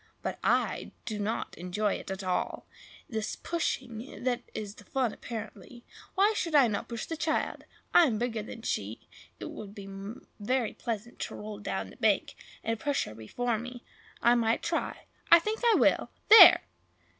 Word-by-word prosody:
but - - -3
I - - +1
do 215 -2 -4
not 215 +3 -2
enjoy 195 +4 -1
it - - -6
at 190 +1 -4
all. 185 -1 -2 0.4
It 220 - -5
is 220 0 -2
the - - -25
pushing 255 -9 -3
that 250 -1 0
is 205 -2 -5
the 205 - -15
fun, 250 +2 -1
apparently. 235 +1 -8 0.3
Why 405 +3 +4
should 335 -5 -2
not 250 -8 +5
I - - -3
push 230 -2 -5
the 325 - -4
child? 315 0 -1 0.3
I 345 - +8
am 225 -5 0
bigger 230 -1 -2
than 225 +2 -9
she; 105 - -3 0.3
it - - -6
would 205 -1 -9
be 200 -1 -9 0.5
very 240 +2 0
pleasant 230 0 -5
to - - -4
roll 210 -1 -7
down 205 - -4
the - - -16
bank, - - +2 0.3
and 225 -1 -1
push 285 +2 0
her 105 - -9
before 220 - -2
me. 245 +1 -8 0.4
I 235 - +6
might 230 -1 +1
try! - - -2 0.3
I 335 - +12
think 430 +6 -2
I 470 -2 +5
will! - - +3 0.2
There!" 440 - +11
230 Hz, 180 wpm, -29 LUFS, 210-255 Hz, 0.5 s, I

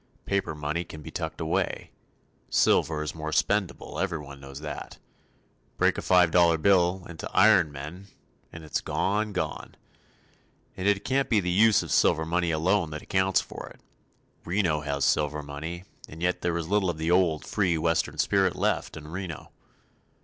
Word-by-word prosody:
Paper 100 -5 -1
money 75 +3 -2
can 80 -2 -11
be - - -8
tucked - - -5
away. - - -2 0.6
Silver 75 -1 +2
is 75 - -4
more 80 -1 -5
spendable, 100 +2 -1
everyone 75 -7 -4
knows 70 0 -9
that. 75 -1 -7 0.8
Break - - +3
a - - -4
five 90 -2 +4
dollar 85 -1 +5
bill 90 0 +2
into 80 -3 -7
"iron 95 -7 +5
men," 75 +8 -8 0.4
and 80 - -10
it's 75 - -2
gone, 105 +2 -1
gone. 80 -6 -4 1.0
And 95 - -2
yet 100 -1 +4
it - - -14
can't 135 +1 +1
be 110 - +4
the 90 -2 -1
use 105 +3 +5
of - - -7
silver 80 - +3
money 85 +1 0
alone 85 +2 +1
that 75 0 -7
accounts 95 0 +2
for - - -9
it. - - -16 0.6
Reno 85 -4 +1
has 70 -2 -1
silver 75 0 +1
money, 80 +5 -6 0.3
and 80 - -10
yet 90 0 0
there 85 -1 0
is 85 -2 -4
little 100 -1 +1
of 85 - -3
the 80 +2 -1
old, 90 -4 +2
free 95 -6 +1
Western 80 +1 0
spirit - - +2
left - - -1
in 75 -1 -9
Reno. 85 -1 -7
85 Hz, 170 wpm, -27 LUFS, 75-95 Hz, 1.0 s, dollar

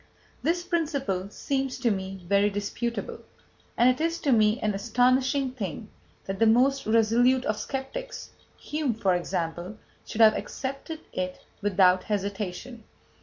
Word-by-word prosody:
This 345 +2 0
principle 280 - -1
seems 270 +3 -2
to 245 -2 +1
me 190 -2 -5
very 200 +2 +3
disputable, 205 +4 -3 0.6
and 240 - +5
it 255 +3 +2
is 335 +1 0
to 280 - +1
me 215 0 +4
an 210 -1 +1
astonishing 255 +5 +2
thing 215 -2 -6 0.4
that 195 0 -4
the 225 - +5
most 260 +4 +3
resolute 235 +4 +3
of 210 0 -1
sceptics - - -5 0.3
Hume, 295 -6 -2
for 195 -4 +1
example 175 +2 -3 0.3
should 225 - -3
have 215 -1 +8
accepted 275 +7 -5
it 185 0 -4 0.2
without 185 -2 +4
hesitation. 205 +3 -4
225 Hz, 135 wpm, -27 LUFS, 200-265 Hz, 0.6 s, have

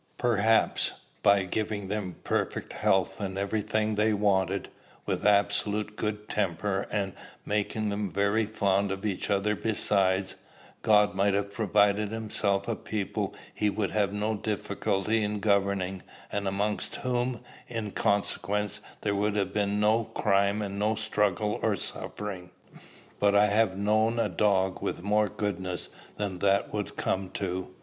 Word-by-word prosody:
"Perhaps, 115 -2 +3 0.3
by 100 -1 +5
giving 105 +1 -2
them 95 -3 -3
perfect - - -2
health, 95 0 +1
and 95 -1 -3
every 100 +2 0
thing 110 +1 0
they 105 +1 +2
wanted, 100 -2 +1 0.4
with - - 0
absolute 105 +1 +2
good 105 0 -3
temper, 95 0 -1
and 100 -2 -1 0.3
making 105 +1 -1
them 100 -2 -2
very 100 +3 +1
fond 100 -2 +1
of 95 +2 -4
each 100 -1 -2
other 100 +1 +2
besides, 95 -3 +1 0.5
God 105 -1 +4
might 100 0 +2
have 100 0 -1
provided 105 -1 +2
himself 105 -3 -1
a 115 - 0
people 105 -3 -3 0.2
he 105 - +1
would 100 -1 -1
have 105 -2 +2
had 105 +1 -5
no 110 +1 0
difficulty 105 +1 -1
in 105 0 -1
governing, 100 -2 +1 0.3
and 100 -1 -2
amongst 100 +2 -1
whom, 125 -1 -1 0.3
in 115 -4 -4
consequence, 100 0 0 0.2
there 105 - 0
would 105 +1 0
have 100 -2 0
been 105 0 0
no 110 +2 +3
crime 100 +1 +1
and 100 0 -4
no 105 +2 +2
struggle 105 -1 0
or - - +2
suffering. 95 -4 -5 0.7
But 100 0 +3
I 105 +1 +6
have 105 -2 +2
known 110 +3 +2
a 115 - +1
dog 95 -3 +1
with - - -3
more 105 +1 +2
goodness 95 -3 -3 0.3
than 100 -3 -3
that 100 +1 +2
would 105 -2 -3
come 95 0 -1
to. 95 -1 -3
100 Hz, 150 wpm, -28 LUFS, 100-105 Hz, 0.7 s, I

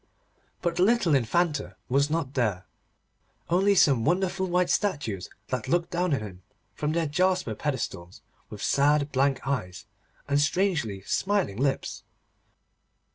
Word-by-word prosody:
But 170 -1 -1
the - - +1
little 200 -5 +3
Infanta 145 +4 +1
was 140 +3 +2
not 150 -4 -2
there, 105 -9 0 0.9
only 195 +3 +4
some 135 -10 +4
wonderful 190 +4 0
white 180 0 +1
statues 135 - -1 0.2
that 125 -4 -3
looked 175 0 0
down 175 0 0
on 130 - -4
him 95 -4 -9 0.3
from 150 +1 -2
their 165 0 +1
jasper 180 -3 +1
pedestals, 105 - -4 0.3
with - - -8
sad 145 +1 +2
blank 135 +1 +1
eyes 110 -8 -3 0.4
and 145 0 +2
strangely 145 - 0
smiling 190 - 0
lips. 135 +2 -1
145 Hz, 130 wpm, -27 LUFS, 125-180 Hz, 0.9 s, only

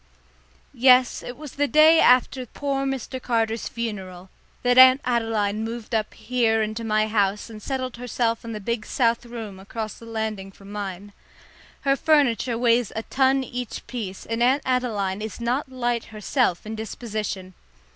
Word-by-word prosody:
Yes, 255 -1 +5
it 245 - -8
was 300 -2 -9
the 290 0 0
day 310 +2 +6
after 255 +1 +4
poor 275 +2 -2
Mr. 260 -1 -4
Carter's 225 -2 0
funeral 190 -5 -6 0.3
that 245 +1 +4
Aunt 260 +1 +9
Adeline 225 -3 0
moved 230 +1 -6
up 215 -1 -1
here 225 -1 +1
into 215 +2 -4
my 215 -1 +2
house 210 0 0
and 215 -1 -10
settled 255 0 -4
herself 235 -1 -1
in 230 - -6
the 215 - -5
big 225 +2 -2
south 235 -1 +1
room 220 -5 -7
across 215 +2 -6
the 230 - -12
landing 220 -3 -4
from 195 +1 -14
mine. 200 -1 -6 0.7
Her 275 -1 +2
furniture 265 -6 +2
weighs 235 -2 +2
a 220 - -3
ton 265 +1 +2
each 245 -1 -6
piece, 205 -7 -6
and 230 +1 -3
Aunt 265 +4 +3
Adeline 215 -7 -1
is 220 0 -6
not 250 +4 -1
light 240 -2 -1
herself 215 -2 -1
in 215 - -5
disposition. 215 -4 -5
230 Hz, 160 wpm, -24 LUFS, 215-255 Hz, 0.7 s, Aunt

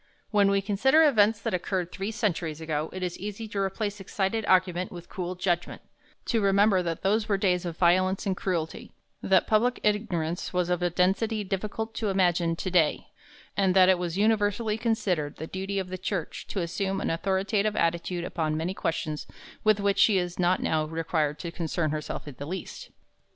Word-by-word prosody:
When 205 -2 +4
we 200 0 +2
consider 265 +10 +4
events 220 -7 +4
that - - -2
occurred 180 0 -2
three 195 +2 -4
centuries 175 -8 -2
ago, 155 -1 -2
it 185 0 -5
is 180 -1 -3
easy 210 +3 -5
to 200 - -3
replace 205 +1 -2
excited 195 +3 -1
argument 180 -1 +2
with 175 -1 -10
cool 180 -2 -4
judgment; 175 -1 -2 0.4
to 230 -2 +1
remember 200 -1 +4
that 165 -2 -4
those 210 +3 +1
were 200 - +3
days 180 -3 +1
of 170 -1 -5
violence 185 +2 +3
and 195 -2 0
cruelty; 170 -4 -3 0.3
that 190 -2 +3
public 240 +3 +2
ignorance 180 -6 -1
was 180 -1 0
of 180 - 0
a 175 - +2
density 200 +5 +1
difficult 210 +3 -3
to 215 - -2
imagine 175 -3 +2
to 185 +2 -4
day; 165 -4 +2 0.5
and 190 -2 +2
that 185 -1 +7
it 185 -2 +4
was 175 0 -3
universally 210 +1 +2
considered 195 -10 -1
the 160 - -6
duty 195 +3 -4
of 190 -1 -2
the 185 0 -5
Church 185 -3 -4
to 195 - -3
assume 190 +3 -2
an - - -1
authoritative 200 +4 0
attitude 170 0 0
upon 155 -3 -2
many 165 +4 -2
questions 155 -4 -3 0.4
with 215 -1 +4
which 200 0 +1
she 205 -1 +5
is 180 -1 -2
not 180 +1 +2
now 155 -1 +1
required 155 -1 -1
to 170 - -6
concern 165 -2 -2
herself 155 0 -4
in 145 - -7
the 140 - -5
least. 185 +3 -6
185 Hz, 190 wpm, -27 LUFS, 170-205 Hz, 0.5 s, that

